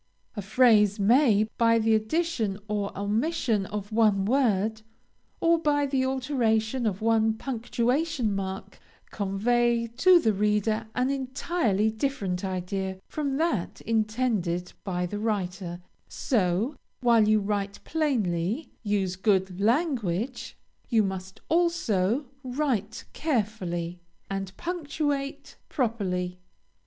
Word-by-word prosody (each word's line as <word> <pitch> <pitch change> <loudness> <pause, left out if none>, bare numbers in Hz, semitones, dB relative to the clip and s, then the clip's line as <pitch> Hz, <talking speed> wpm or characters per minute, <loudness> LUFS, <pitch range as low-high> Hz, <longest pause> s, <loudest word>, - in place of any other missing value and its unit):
A 205 - -3
phrase 210 -1 +4
may, 220 0 +4 0.2
by 230 -1 +5
the 225 0 +2
addition 220 - 0
or 205 -1 -2
omission 215 - 0
of 205 0 -5
one 215 -3 +3
word, 220 -3 +1 0.6
or 335 0 +3
by 290 -2 +2
the 265 -1 0
alteration 250 -3 0
of 205 +1 -3
one 225 -1 +3
punctuation 245 +2 -1
mark, 195 0 -5 0.3
convey 235 +4 +1
to 370 -2 +7
the 220 -9 +2
reader 210 +2 +1
an 255 +2 +1
entirely 260 - 0
different 215 -7 -2
idea 190 0 -3
from 280 -3 -2
that 285 - -1
intended 215 -6 -1
by 180 -2 -2
the 205 +4 -4
writer; 190 -5 -2 0.3
so, 210 - 0 0.3
while 230 -3 +4
you 215 0 +4
write 200 -1 -2
plainly, 235 - -1
use 200 -4 0
good 190 -2 +1
language, 240 - 0 0.3
you 225 -4 +4
must 190 -1 -5
also 285 - +1 0.2
write 250 -5 -2
carefully, 195 - -2 0.3
and 195 -1 -4
punctuate 290 -5 -3
properly. 185 - -1
220 Hz, 110 wpm, -27 LUFS, 195-260 Hz, 0.6 s, to